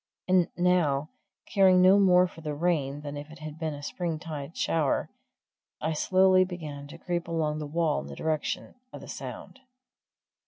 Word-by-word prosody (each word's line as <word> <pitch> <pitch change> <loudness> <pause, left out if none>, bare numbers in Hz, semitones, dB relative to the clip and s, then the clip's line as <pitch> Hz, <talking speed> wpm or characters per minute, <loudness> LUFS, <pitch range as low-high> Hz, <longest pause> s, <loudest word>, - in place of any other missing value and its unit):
And 185 -2 +4
now, 165 -5 +2 0.3
caring 190 -2 +5
no 185 +2 +7
more 180 -2 +6
for 170 -2 -10
the 150 -2 -4
rain 145 -4 0
than 145 -1 -6
if 145 +1 -7
it 160 - -12
had 155 0 -8
been 160 -2 -2
a 145 - -10
springtide 160 -2 -5
shower, 155 -4 0 0.7
I 160 +1 -1
slowly 185 +3 +4
began 155 -6 -7
to - - -11
creep 175 -1 -3
along 155 -2 -1
the 150 - -4
wall 160 - +1
in 70 - -8
the 70 - -8
direction 155 - -2 0.2
of - - -9
the - - -11
sound. - - -8
160 Hz, 170 wpm, -28 LUFS, 150-180 Hz, 0.7 s, no